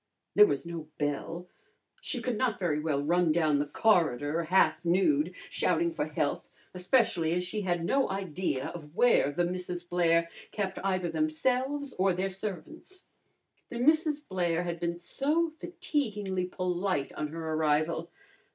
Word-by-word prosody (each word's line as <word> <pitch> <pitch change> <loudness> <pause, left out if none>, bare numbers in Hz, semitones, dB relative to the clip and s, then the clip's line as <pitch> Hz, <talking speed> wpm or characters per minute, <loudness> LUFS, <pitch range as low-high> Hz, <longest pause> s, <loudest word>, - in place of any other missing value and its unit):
There 415 - +8
was 370 - -2
no 165 -2 -6
bell. 155 +4 -3 0.5
She 250 - -3
could 245 0 -1
not 240 0 0
very 165 -5 0
well 150 -2 -1
run 170 +2 +2
down 155 -3 +2
the 145 - -1
corridor, 165 - +2
half 160 -2 +3
nude, 195 - +2
shouting 340 0 0
for - - -2
help, - - -2 0.3
especially 180 -3 +2
as 180 +1 0
she 210 +4 -3
had 175 -3 -1
no 270 +8 +2
idea 180 -7 -2
of 155 -2 -10
where 235 - +4
the 175 +4 0
Misses 180 0 -4
Blair 170 -1 +2 0.2
kept 195 -3 -3
either 185 -3 0
themselves 285 -3 0
or 190 0 +3
their 185 +2 -1
servants. 220 - -7 0.7
The 235 - -6
Misses 305 +3 +3
Blair 175 - -1
had 170 -1 -4
been 170 0 -2
so 305 - 0
fatiguingly 215 - -2
polite 180 -4 -1
on 150 - -3
her 160 +1 -4
arrival. 155 +2 +1
180 Hz, 150 wpm, -29 LUFS, 165-240 Hz, 0.7 s, There